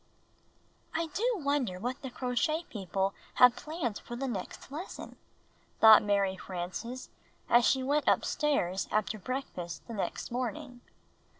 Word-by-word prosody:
DO 335 Hz, +9 st, 0 dB
wonder 280 Hz, -, 0 dB
what 250 Hz, +6 st, -3 dB
the 265 Hz, -, -5 dB
Crochet 255 Hz, +7 st, 0 dB
People 195 Hz, -1 st, -1 dB, 0.2 s
have 250 Hz, -1 st, +7 dB
planned 305 Hz, -, -3 dB
for 240 Hz, -, -8 dB
the 270 Hz, +3 st, -3 dB
next 215 Hz, +2 st, -6 dB
lesson," 320 Hz, +7 st, -7 dB, 0.6 s
thought 220 Hz, -1 st, +9 dB
Mary 200 Hz, -2 st, +1 dB
Frances 185 Hz, +8 st, -5 dB, 0.4 s
as 240 Hz, 0 st, +5 dB
she 265 Hz, -1 st, +3 dB
went 290 Hz, +3 st, +1 dB
upstairs 200 Hz, -, +1 dB
after 215 Hz, 0 st, 0 dB
breakfast 185 Hz, -, -5 dB
the 235 Hz, -, -6 dB
next 205 Hz, -, -3 dB
morning. 250 Hz, +1 st, -4 dB
245 Hz, 125 wpm, -31 LUFS, 200-280 Hz, 0.6 s, thought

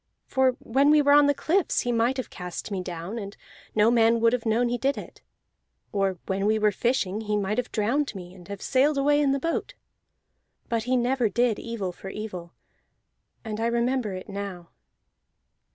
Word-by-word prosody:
For 265 Hz, -1 st, +2 dB
when 275 Hz, +5 st, +2 dB
we 305 Hz, 0 st, +6 dB
were 285 Hz, -1 st, +4 dB
on 290 Hz, 0 st, +7 dB
the 285 Hz, -, +4 dB
cliffs 355 Hz, +6 st, +1 dB
he 245 Hz, -, -1 dB
might 235 Hz, +3 st, +1 dB
have 260 Hz, -, -5 dB
cast 180 Hz, +3 st, -6 dB
me 190 Hz, -2 st, -2 dB
down, 180 Hz, +5 st, -5 dB
and 200 Hz, -1 st, -8 dB, 0.4 s
no 215 Hz, +2 st, +5 dB
man 230 Hz, -1 st, +4 dB
would 230 Hz, +1 st, +3 dB
have 240 Hz, -2 st, -1 dB
known 230 Hz, +3 st, +2 dB
he 245 Hz, 0 st, -1 dB
did 275 Hz, +1 st, 0 dB
it. -, -, -9 dB, 0.7 s
Or 195 Hz, -2 st, 0 dB
when 195 Hz, +1 st, -1 dB
we 220 Hz, +1 st, +3 dB
were 210 Hz, -1 st, +3 dB
fishing 215 Hz, -2 st, 0 dB
he 210 Hz, -1 st, -1 dB
might 205 Hz, +3 st, -1 dB
have 250 Hz, -, -4 dB
drowned 240 Hz, +4 st, 0 dB
me, 180 Hz, -1 st, -9 dB
and 180 Hz, -2 st, -14 dB
have 200 Hz, -1 st, -7 dB
sailed 280 Hz, +2 st, +2 dB
away 290 Hz, +1 st, +3 dB
in 280 Hz, -2 st, +3 dB
the 275 Hz, -, +1 dB
boat. 335 Hz, -, -2 dB, 0.9 s
But 230 Hz, -1 st, -1 dB
he 255 Hz, +1 st, +2 dB
never 245 Hz, -1 st, +1 dB
did 240 Hz, 0 st, +1 dB
evil 225 Hz, -6 st, -4 dB
for 190 Hz, +2 st, -9 dB
evil, 185 Hz, -5 st, -7 dB, 0.9 s
and 215 Hz, -1 st, -4 dB
I 230 Hz, -, +1 dB
remember 235 Hz, -2 st, 0 dB
it 185 Hz, -, -8 dB
now." 195 Hz, -4 st, -6 dB
230 Hz, 195 wpm, -26 LUFS, 200-260 Hz, 0.9 s, on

